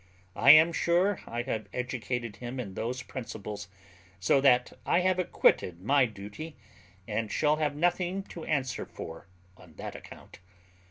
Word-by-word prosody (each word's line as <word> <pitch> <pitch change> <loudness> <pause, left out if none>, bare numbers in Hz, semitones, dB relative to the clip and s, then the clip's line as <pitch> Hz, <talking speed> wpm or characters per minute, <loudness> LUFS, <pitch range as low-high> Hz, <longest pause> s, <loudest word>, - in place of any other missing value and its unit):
I 130 - +4
am 155 +3 +9
sure 180 +4 +2
I 120 +1 -3
have 110 -4 -4
educated 125 -2 -3
him 125 +1 -6
in 100 -6 -5
those 125 +5 -3
principles; 105 -5 -7 0.5
so 100 +9 +3
that 125 -3 +4
I 175 - +2
have 185 0 +2
acquitted 90 - +2
my 135 +3 +4
duty, 105 +9 -9 0.5
and 110 0 -2
shall 150 0 +2
have 150 -2 0
nothing 175 +4 0
to 170 -3 -9
answer 135 -5 -1
for 80 +2 -9 0.3
on 80 -4 -17
that - - -7
account. - - -12
125 Hz, 150 wpm, -29 LUFS, 110-155 Hz, 0.5 s, am